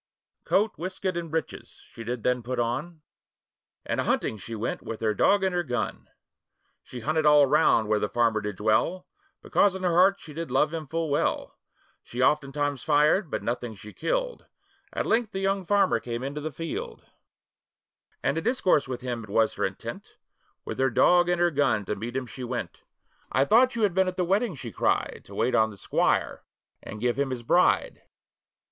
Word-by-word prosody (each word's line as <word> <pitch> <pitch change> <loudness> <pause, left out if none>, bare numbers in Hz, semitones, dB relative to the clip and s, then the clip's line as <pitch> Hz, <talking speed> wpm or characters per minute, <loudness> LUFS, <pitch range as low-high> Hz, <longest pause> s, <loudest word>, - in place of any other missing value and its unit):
Coat, 210 +3 +2
waistcoat, 185 +1 -3
and 170 -1 -4
breeches 160 +1 -5
she - - -12
then 120 +1 -4
did 125 +1 0
put 125 +2 -4
on, 150 +8 -3 0.8
And - - -1
a - - -3
hunting 110 - 0
she 115 +4 -7
went 110 - -3
with 115 - -6
her 110 -1 +1
dog 200 - +3
and 190 -1 +1
her 175 - +1
gun; 125 -7 -4 0.7
She 125 - -9
hunted 155 +5 0
all 150 -1 +6
round 115 -4 +3
where 105 0 +2
the 105 - -1
farmer 115 -2 +1
did 105 -1 -4
dwell, 110 - +1 0.4
Because 200 -2 +2
in 190 - -6
her 180 - +2
heart 190 +3 +4
she 150 - -11
did 165 +2 -5
love 150 +5 +2
him 160 -2 -5
full 165 0 -2
well: 145 - -1 0.5
She 120 - -9
oftentimes 145 0 +1
fired, 150 +6 +3
but - - -3
nothing 120 -2 -3
she 105 +3 -12
killed, - - -2 0.4
At - - -2
length 225 -2 +1
the 190 - -2
young 195 -1 -1
farmer 205 +1 +3
came 120 0 -5
into 140 +2 -4
the 155 +1 -4
field; 165 +3 -6 1.2
And - - +2
to - - 0
discourse 190 - +2
with 130 -1 -5
him 120 -2 -4
it 105 - -12
was 110 +2 +2
her - - -1
intent, - - -7 0.5
With - - -6
her 135 0 +3
dog 175 +8 +4
and 175 -1 +1
her 175 0 +3
gun 140 -8 +1
to 105 - -2
meet 115 +5 -6
him 130 - -3
she 125 +1 -9
went. 120 -7 -5 0.5
'I 135 +1 +3
thought 245 - +4
you 230 - 0
had 200 -4 +2
been 190 +1 +2
at 185 - -3
the 180 - +1
wedding,' 195 +1 +1
she 120 -4 -7
cried, - - 0
'To 100 - -12
wait 115 +5 +1
on 110 0 +4
the 105 - -12
squire, - - 0 0.4
and 110 - -8
give 120 +3 0
him 140 -1 +1
his 125 -2 -5
bride. - - +2
145 Hz, 200 wpm, -26 LUFS, 120-180 Hz, 1.2 s, all